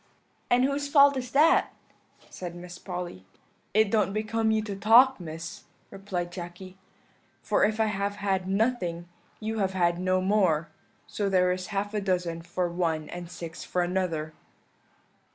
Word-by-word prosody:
"'And 245 +1 +4
whose 280 +2 0
fault 280 -1 +6
is 250 -2 -4
that?' 310 +7 +4 0.6
said 175 -2 -7
Miss 175 0 -9
Polly. 180 - -6 0.5
"'It 215 -2 +4
don't 210 -3 +2
become 220 +1 0
you 220 0 +2
to 205 -2 -5
talk, 235 +6 +6
Miss,' 165 0 -7 0.3
replied 190 -3 -4
Jacky; 180 +1 -8 0.7
'for - - +2
if 215 +1 +1
I 220 - +4
have 200 -1 -2
had 190 -2 -1
nothing, 190 -5 0 0.3
you 220 0 -3
have 190 -1 0
had 175 -2 +1
no 185 0 +1
more 185 -5 +2 0.4
so 205 -2 -2
there 180 -1 +3
is 185 0 -3
half 205 0 -3
a 210 - -1
dozen 180 -3 -1
for 175 +1 -2
one 165 -3 -2
and 175 -1 -7
six 170 -1 -8
for 180 - -1
another.' 175 -4 -2
190 Hz, 155 wpm, -27 LUFS, 175-215 Hz, 0.7 s, fault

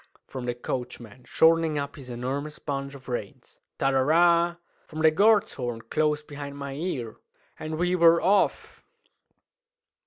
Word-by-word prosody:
"Cl'k!" - - -32
from 130 -2 -5
the 120 - -1
coachman, 120 -1 -6
shortening 160 +1 +3
up 140 -1 -4
his 130 -3 -11
enormous 135 +5 -4
bunch 140 -1 -5
of 130 -1 -14
reins; 120 -5 -7 0.2
ta 135 - +1
ra 135 - +2
ra! 170 +4 +3 0.3
from 155 0 -6
the 160 - +6
guard's 205 +5 +3
horn 120 -3 -4
close 150 +6 -1
behind 145 -1 -8
my 140 -1 -6
ear; 135 -7 -4 0.4
and 155 0 -5
we 180 +2 +1
were 170 -1 +6
off! 195 +3 +1
145 Hz, 155 wpm, -26 LUFS, 130-165 Hz, 0.4 s, the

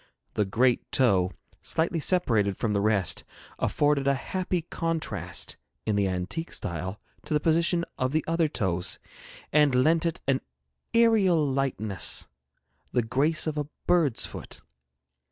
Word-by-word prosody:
The 105 - +1
great 120 +5 +1
toe, 95 -8 +3 0.3
slightly 165 +1 0
separated 115 - +2
from 110 -2 -1
the 100 - +1
rest, 100 -4 +1 0.4
afforded 145 -2 +1
a 140 - +4
happy 180 +3 -2
contrast, 165 -1 -3 0.3
in 110 - 0
the 100 -1 +2
antique 95 - -3
style, 90 +4 -3 0.3
to 150 - -1
the - - +3
position 170 +2 +2
of 130 0 0
the 155 +1 0
other 165 0 +2
toes, 95 - -1 0.6
and 150 -3 +4
lent 160 +6 +3
it 165 - -3
an 135 -1 +2 0.5
aerial 200 -9 +4
lightness 130 -8 0 0.7
the 125 - +1
grace 140 +7 +1
of 155 -2 -2
a 145 - -3 0.2
bird's 155 -9 +2
foot. - - -8
135 Hz, 135 wpm, -27 LUFS, 105-165 Hz, 0.7 s, a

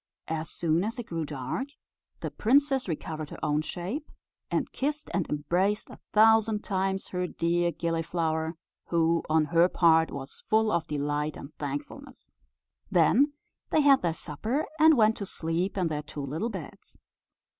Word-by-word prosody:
As 160 0 -3
soon 165 +1 +1
as 225 +5 -3
it 240 - -5
grew 165 -4 -3
dark, 145 - -4 0.5
the - - -3
princess 270 +2 +2
recovered 155 -2 -4
her - - -8
own 150 +1 +1
shape, 190 - -5 0.4
and - - -1
kissed 300 +3 -3
and 180 - -1
embraced 180 +8 0
a - - -12
thousand 220 0 +4
times 190 -1 -1
her 180 0 -2
dear 170 0 0
Gilliflower, 165 -1 -1 0.3
who, 165 0 +2
on 155 0 +3
her 170 +2 +5
part, 160 -2 +4
was 135 -1 -8
full 220 0 +3
of 170 -4 0
delight 150 +1 -2
and 140 - -10
thankfulness. 145 -1 -6 0.6
Then 210 - +4 0.4
they 310 - +3
had 280 -2 +6
their 170 - +1
supper, 215 - -2
and 315 -2 +7
went 220 -1 +4
to 200 - -4
sleep 170 +5 -1
in 180 -3 +1
their 150 -2 -2
two 145 -1 -6
little 160 - -2
beds. 190 -9 -9
170 Hz, 155 wpm, -28 LUFS, 155-215 Hz, 0.6 s, and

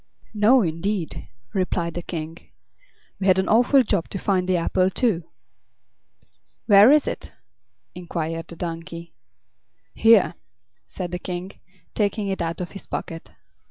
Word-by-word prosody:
"No, 220 +4 +4
indeed," 170 +1 -3 0.3
replied 175 -3 -1
the 175 - -4
King. 165 -1 -6 0.8
"We 195 - -1
had 185 -1 +5
an 190 - +1
awful 250 +4 +4
job 200 -6 -1
to - - -4
find 185 -1 0
the 185 - +3
apple, 185 +2 +1
too." 190 -6 0 1.4
"Where 205 +3 +7
is 300 0 +5
it?" - - -5 0.6
inquired 165 -2 -4
the 170 - -10
donkey. 170 0 -7 0.8
"Here," 225 -5 +5 0.5
said 180 -2 -6
the 180 - -3
King, 180 +1 -5 0.4
taking 205 -1 -1
it 190 - -2
out 170 +1 -3
of 175 - -5
his 195 - -11
pocket. 165 0 -6
185 Hz, 135 wpm, -23 LUFS, 170-205 Hz, 1.4 s, Where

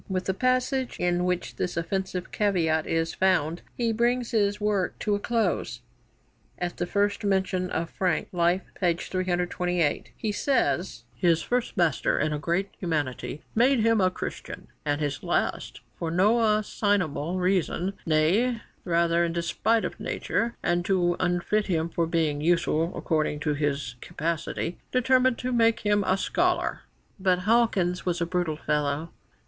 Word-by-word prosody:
With 185 -1 -1
the 190 - 0
passage 255 +3 0
in 175 0 +1
which 180 -1 -2
this 180 - -2
offensive 185 +1 -3
caveat 165 -7 +1
is 165 0 0
found 175 -3 +1 0.2
he 230 -2 +1
brings 240 +1 +1
his 205 -2 +1
work 205 -3 0
to 210 - -1
a 205 - +1
close. 200 - -1 0.8
At 175 0 -3
the 175 - -2
first 205 +1 0
mention 190 -2 0
of 165 -1 -2
Frank 180 -4 0
(Life, 175 +1 +2 0.2
p. 175 -3 +2
328) 180 -2 -1
he 215 - -2
says: 210 -6 0
'His 170 -3 +2
first 245 -3 -1
master 170 -5 +2
had 155 - +1
in 150 - -2
great 175 +6 -1
humanity 150 -4 -3
made 245 +2 +4
him 225 -1 +3
a 185 - +4
Christian, - - -7
and 145 0 0
his 145 -3 -2
last - - -2 0.2
for 165 - -2
no 210 +5 +3
assignable 185 -6 0
reason, 185 0 0
nay 185 +10 +2 0.2
rather 170 -1 +2
in 170 -1 -1
despite 175 +7 +1
of - - -5
nature, 235 0 -2
and 175 0 +1
to 175 -2 +2
unfit 180 +4 0
him 165 -3 0
for 170 0 0
being 160 -3 0
useful 165 0 +2
according 155 -2 0
to 150 -1 0
his 140 -4 -2
capacity, 165 +2 -3
determined 255 0 +3
to 255 0 -3
make 230 -1 +3
him 205 -1 +2
a 185 - +3
scholar.' 355 - 0 0.4
But 185 -1 +2
Hawkins 205 -6 +2
was 175 -1 -1
a 170 - +1
brutal 170 -3 -1
fellow. 150 +1 -1
180 Hz, 155 wpm, -26 LUFS, 165-210 Hz, 0.8 s, made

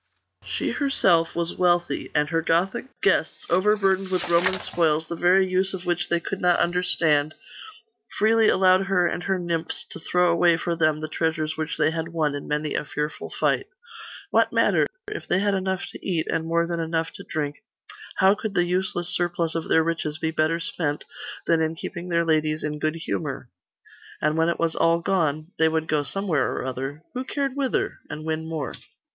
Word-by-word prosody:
She - - -2
herself 180 - +2
was 170 0 -2
wealthy; 175 -1 +1
and 150 0 +3
her 165 - +2
Gothic 170 +8 0 0.2
guests, - - +1
overburdened 195 0 +2
with 185 -1 -1
Roman 180 +2 +3
spoils, 160 -2 +1
the 170 - -4
very 185 +3 +4
use 185 +1 +1
of 185 0 -8
which 175 0 -1
they 170 - +2
could 190 +3 -5
not 175 -1 +3
understand, 160 -4 +2 0.8
freely 220 +1 +4
allowed 190 0 +4
her 185 -2 +3
and 175 - -1
her 195 -1 +1
nymphs 170 -2 -2
to - - -7
throw 180 +2 +2
away 170 0 +4
for 170 0 -2
them 155 -2 +1
the 155 - -3
treasures 155 -1 -1
which 155 0 -3
they - - +3
had 160 0 -3
won 160 -3 -1
in 145 - -6
many 150 0 -1
a - - -1
fearful 150 +1 -4
fight. - - 0 0.6
What - - +3
matter? - - +3 0.2
If 420 0 -6
they 180 - +2
had 200 +1 +1
enough 190 -1 -1
to - - -11
eat, 170 -4 0
and 160 0 -1
more 170 0 +2
than 170 0 -3
enough 165 0 -2
to - - -9
drink, 145 -2 -3 0.6
how 190 +1 +5
could 210 -1 -5
the 175 - +3
useless 180 -1 0
surplus 175 -2 0
of 165 -1 -3
their 160 - +4
riches 160 -2 -2
be 160 0 -1
better 160 +1 +1
spent 150 -3 -2 0.4
than 165 -1 +3
in 160 0 0
keeping 175 +2 -6
their 170 -1 +2
ladies 155 -1 +1
in 150 0 -3
good 155 +1 0
humour?.... 145 -5 -4 0.7
And 150 +1 +1
when 165 +1 +2
it 170 - -1
was 165 -1 +1
all 165 0 +3
gone....they 160 -1 0
would 160 0 -1
go 150 -1 +1
somewhere 160 -3 -1
or - - -4
other 135 +4 -5
who 255 - -3
cared 275 0 -2
whither? 275 -2 -1
and 155 +1 -6
win 160 0 -2
more. 160 -3 -3
170 Hz, 190 wpm, -24 LUFS, 155-185 Hz, 0.8 s, how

